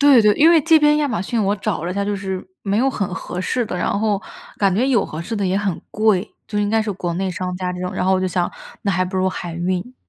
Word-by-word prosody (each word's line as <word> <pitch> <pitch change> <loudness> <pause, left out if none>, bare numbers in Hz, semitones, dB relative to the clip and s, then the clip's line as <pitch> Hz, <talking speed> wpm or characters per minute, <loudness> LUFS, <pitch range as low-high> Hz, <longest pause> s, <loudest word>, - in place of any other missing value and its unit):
对 280 -4 +7
对， 210 -1 +5
因 320 +3 +6
为 330 -2 +6
这 325 +2 +5
边 300 0 +4
亚 295 -1 +1
马 180 -7 -1
逊 230 +2 -1
我 200 +1 +1
找 195 -4 -2
了 175 - -2
一 - - -4
下， 200 0 0
就 205 0 -1
是 190 -1 -4 0.2
没 200 0 0
有 265 +3 +3
很 200 -8 -3
合 180 -1 -5
适 245 +6 0
的， 205 - -4
然 200 - 0
后， 210 -2 +1 0.4
感 195 -2 +3
觉 245 +6 +2
有 240 -7 +3
合 155 +2 -6
适 225 - -4
的 200 -2 0
也 185 - +1
很 200 -4 -1
贵， 215 -2 +1
就 210 - -3
应 205 - +1
该 220 +1 +2
是 215 - -3
国 175 -2 -3
内 190 +2 -1
商 180 0 -3
家 180 0 -2
这 180 - -6
种， 180 0 -3
然 - - -2
后 190 - +3
我 185 - +2
就 185 - 0
想， 180 -1 0 0.3
那 200 - +1
还 185 0 +1
不 185 +1 -4
如 185 0 +2
海 175 -2 -5
运。 180 +7 -2
195 Hz, 320 characters per minute, -20 LUFS, 185-220 Hz, 0.4 s, 对